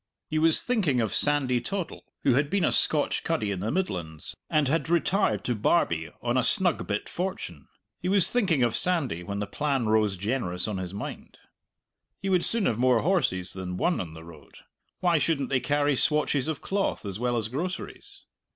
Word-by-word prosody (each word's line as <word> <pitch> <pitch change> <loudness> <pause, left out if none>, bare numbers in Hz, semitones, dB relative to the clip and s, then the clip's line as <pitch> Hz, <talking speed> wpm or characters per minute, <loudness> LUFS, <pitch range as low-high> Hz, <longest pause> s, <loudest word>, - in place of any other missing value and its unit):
He 155 - +1
was 160 0 +5
thinking 190 - +1
of 110 -3 -1
Sandy 135 -4 +2
Toddle, 195 +2 -5 0.2
who 135 - +4
had 140 +3 +1
been 200 0 +1
a - - +2
Scotch 150 -2 +2
cuddy 155 -11 -1
in 95 - -3
the 105 +4 -2
Midlands, 85 - -3
and 150 -2 +2
had 165 +4 0
retired 175 +4 +1
to 125 - 0
Barbie 85 - +1
on 120 +1 +1
a 125 - +2
snug 185 -5 +2
bit 105 0 -2
fortune 90 - -5 0.3
he 180 - -3
was 195 -2 +5
thinking 185 - +1
of 120 -2 +1
Sandy 160 - +1
when 100 +3 -5
the 105 - -2
plan 135 +3 -1
rose 110 -2 +2
generous 95 -3 -2
on 105 -3 -3
his 90 -1 -5
mind. 100 - -7 0.8
He 195 - -3
would 180 -2 +3
soon 230 -3 +2
have 115 - 0
more 125 -2 +3
horses 100 - +1
than 90 -1 -5
one 175 - +1
on 80 -3 -8
the 80 - -10
road; 80 -4 -15 0.5
why 175 -3 +3
shouldn't 140 -4 0
they 135 - +2
carry 145 +1 +1
swatches 150 -1 +1
of 160 -2 -3
cloth 195 - -1
as 100 0 -5
well 120 0 0
as 110 -2 -1
groceries? 170 +10 -6
130 Hz, 195 wpm, -27 LUFS, 100-165 Hz, 0.8 s, was